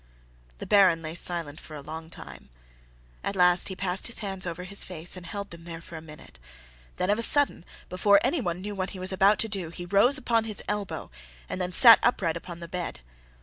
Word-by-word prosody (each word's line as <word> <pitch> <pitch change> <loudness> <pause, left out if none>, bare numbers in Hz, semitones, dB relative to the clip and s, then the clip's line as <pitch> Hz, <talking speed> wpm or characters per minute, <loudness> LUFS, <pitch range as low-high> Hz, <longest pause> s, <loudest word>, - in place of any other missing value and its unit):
The - - -8
Baron 185 -5 +4
lay 155 0 -6
silent 170 -3 0
for 155 - -12
a 145 - -8
long 160 +3 -9
time. 70 - -12 0.7
At 200 - -3
last 180 -1 +4
he 190 - -6
passed 185 0 -2
his 235 - 0
hands 195 -3 -3
over 175 +1 -6
his 200 +2 0
face 175 -1 0
and 180 -2 -11
held 200 +2 -7
them 170 0 -11
there 165 -1 -8
for 170 - -12
a 160 - -8
minute, 150 - -14 0.6
then 185 - 0
of 210 - 0
a - - 0
sudden, 285 -3 +3 0.2
before 200 +2 +3
anyone 235 - -1
knew 205 +2 -5
what 190 -1 -4
he - - -9
was 185 +1 -1
about 195 +2 +3
to 225 - 0
do, 195 -6 -3
he 175 +1 -8
rose 205 +10 +3
upon 230 -4 0
his 215 -2 -4
elbow 195 - -4 0.4
and 185 - -5
then 180 0 -2
sat 230 +4 +8
upright 190 -9 0
upon 170 0 -9
the 170 - -7
bed. 175 - -6
180 Hz, 220 wpm, -26 LUFS, 170-200 Hz, 0.7 s, sat